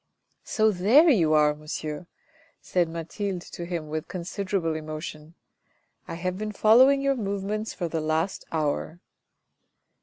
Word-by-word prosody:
" - - -46
So 220 0 +4
there 230 - +5
you 165 - +3
are, 150 -1 +4
monsieur," 150 +2 -6 0.5
said 175 -2 0
Mathilde 175 +3 -4
to 170 - -8
him 170 -3 -4
with 155 0 -4
considerable 185 -1 -2
emotion. 155 0 -7 0.4
" - - -39 0.3
I - - -5
have 185 +2 -3
been 215 0 -4
following 255 +7 +5
your 275 0 +2
move 200 -4 -3
ments 215 +2 -3
for 175 - -2
the 160 -1 -2
last 160 +4 -1
hour." 155 +1 -2
175 Hz, 150 wpm, -26 LUFS, 155-205 Hz, 0.5 s, there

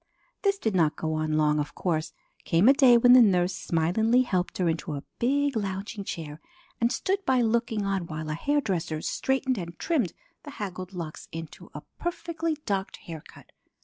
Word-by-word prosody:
This 400 -1 +2
did 220 - -1
not 165 -5 +2
go 160 0 -2
on 155 0 -1
long, 150 -1 +3
of 145 0 -4
course. 160 -3 -1 0.3
Came 170 +6 +3
a 270 - +9
day 260 -4 +6
when 245 +1 +7
the 255 - +9
nurse 180 -4 +3
smilingly 220 +10 +2
helped 185 -7 -1
her 180 - +1
into 160 -2 -2
a 140 - -6 0.2
big 280 +2 +1
lounging 200 0 -3
chair 155 -3 -6 0.4
and 235 +1 +2
stood 390 +8 -1
by 260 -7 +3
looking 225 -2 0
on 195 -3 -1
while 155 -1 -5
a - - -1
hairdresser 175 - -1
straightened 265 -3 0
and 170 -1 -7
trimmed 280 - 0 0.3
the 295 - -10
haggled 185 -2 -5
locks 165 -4 -7
into 165 -1 -8
a - - -6 0.2
perfectly 335 -2 -2
docked 195 -1 -2
hair 160 -3 -9
cut. - - -16
195 Hz, 180 wpm, -27 LUFS, 165-250 Hz, 0.4 s, a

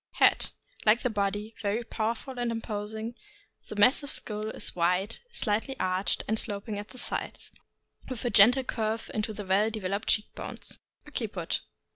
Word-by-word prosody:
Head. - - +4 0.2
— - - -19
Like 220 +3 +6
the 250 - +1
body, 205 +1 -1
very 215 +3 0
powerful 230 +3 -2
and 240 -1 0
imposing; 220 0 -3 0.6
the - - -4
massive 255 +7 +5
skull 215 -3 +1
is - - -1
wide, 180 +5 +1
slightly 240 - -1
arched, 185 +1 +1
and 220 +1 +2
sloping 205 -1 -2
at 205 - -6
the 255 - -12
sides, - - -4 0.6
with 255 -2 -4
a 240 - +1
gentle 245 +6 +7
curve 220 -2 -2
into 215 0 -1
the 210 -1 -6
well 195 +3 +3
developed 200 -2 -2
cheek 210 - +2
bones. - - -5 0.3
Occiput. - - -2
215 Hz, 160 wpm, -29 LUFS, 205-230 Hz, 0.6 s, gentle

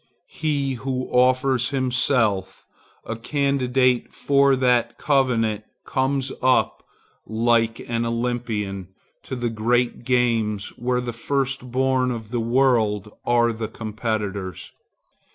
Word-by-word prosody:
He 145 -4 -1
who 130 +1 -3
offers 130 0 +3
himself 125 -7 0 0.4
a 115 - -4
candidate 130 -1 +1
for 140 -1 +3
that 125 -2 +1
covenant 115 -7 +1 0.2
comes 135 0 0
up, 130 0 +2 0.5
like 115 +1 +2
an 115 0 -1
Olympian, 115 -5 -2 0.3
to 130 - -6
the 120 -2 -2
great 120 +3 0
games 115 -5 +1
where 125 0 -2
the 120 -1 -4
first 135 +1 -2
born 130 0 +1
of 115 -3 -5
the 120 - -1
world 115 -4 +2 0.2
are 120 -1 +3
the 110 0 -4
competitors. 105 -4 -4
120 Hz, 110 wpm, -23 LUFS, 115-130 Hz, 0.5 s, offers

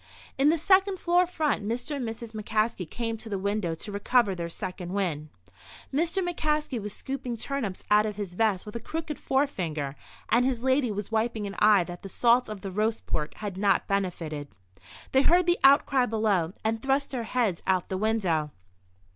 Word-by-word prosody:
In 275 +2 +4
the 330 - +3
second 380 +3 +3
floor 355 +1 +3
front 310 - 0
Mr. 245 +8 -3
and 250 -5 -3
Mrs. 225 0 -7
McCaskey 215 -4 -1
came 230 -1 -3
to 220 +1 -9
the 200 - -1
window 200 -3 -1
to 205 +6 -6
recover 205 +1 +2
their 170 -2 -4
second 180 0 -5
wind. 160 -7 -2 0.6
Mr. 340 +5 +1
McCaskey 300 -7 -1
was 210 +1 -4
scooping 260 0 -5
turnips 225 -7 -3
out 210 +1 +5
of 210 - -4
his 200 -3 -5
vest 205 -1 +1
with 210 - -9
a - - -2
crooked 310 +5 -5
forefinger, 170 - -1 0.3
and 235 +3 +4
his 250 -2 0
lady 260 -1 +2
was 205 0 -4
wiping 220 -1 0
an 200 - -5
eye 210 -3 +6
that 175 0 -8
the 195 - -8
salt 240 +4 +3
of 210 -2 -6
the 195 - -5
roast 215 +3 -1
pork 150 -1 -3
had 205 -3 -5
not 200 0 +2
benefited. 170 -7 -2 0.6
They 265 - +5
heard 350 +5 +4
the 350 0 +2
outcry 270 -2 +5
below, 205 -6 +1
and 225 0 0
thrust 275 +2 +1
their 255 -3 -2
heads 220 -7 0
out 185 -2 +3
of - - -32
the 190 - -2
window. 190 -8 +1
220 Hz, 190 wpm, -27 LUFS, 195-265 Hz, 0.6 s, eye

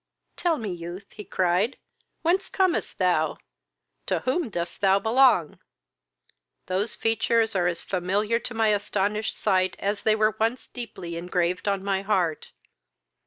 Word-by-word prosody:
"Tell 340 -3 +1
me, 215 -6 -4
youth, 175 +3 -7
(he 210 - -9
cried,) 185 +6 +1 0.5
whence 360 +4 +1
comest 375 -3 0
thou? 180 -4 +1 0.7
to - - 0
whom 265 +1 0
dost 175 -2 -4
thou 195 -1 +5
belong? 225 - +3 1.1
Those 195 +4 -1
features 225 0 +1
are 175 -2 +2
as 170 -1 -2
familiar 200 +5 0
to 245 - -7
my 225 -1 +3
astonished 210 +1 0
sight 185 -3 +1
as 200 +1 -2
they 215 0 +3
were 215 -1 +2
once 230 +3 0
deeply 180 -8 -7
engraved 180 +2 -1
on 200 -1 0
my 195 -1 0
heart. 185 -6 0
200 Hz, 140 wpm, -26 LUFS, 180-225 Hz, 1.1 s, thou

